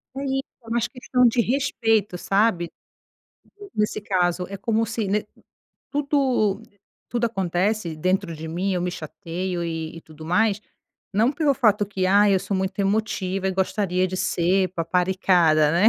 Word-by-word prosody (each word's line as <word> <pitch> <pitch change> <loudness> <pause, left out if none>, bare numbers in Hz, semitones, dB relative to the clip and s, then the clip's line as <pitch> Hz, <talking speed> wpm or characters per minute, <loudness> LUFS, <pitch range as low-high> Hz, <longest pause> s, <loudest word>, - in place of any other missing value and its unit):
É 275 - -4
isso, 270 0 -1 0.2
é - - -8
mais 235 0 0
questão 250 -1 +1
de 240 +1 +3
respeito, 225 -6 +1
sabe, 195 -2 +1 1.1
nesse 210 0 0
caso. 180 -3 0
É 200 - -5
como 225 +3 0
se 225 0 -2
ne 205 +2 0 0.7
tudo 270 -8 +1 0.5
tudo 240 -1 0
acontece, 190 -2 -1
dentro 185 +2 0
de 160 +1 -7
mim, 180 +5 -1
eu 180 - -1
me 180 - -1
chateio 175 +2 -4
e 160 -1 -4
e - - -10
tudo 155 -1 -13
mais, 200 +5 +2 0.5
não 220 +5 +3
pelo 295 -2 +2
fato 210 -5 +3
que: 195 -2 -2
"Ai, 200 +1 +5
eu - - +2
sou 195 - -3
muito 190 +1 -3
emotiva 195 -2 0
e - - +1
gostaria 190 -1 0
de 185 - -4
ser 185 +1 +1
paparicada", 175 -3 +2
né. 180 +6 +5
195 Hz, 160 wpm, -23 LUFS, 180-220 Hz, 1.1 s, Ai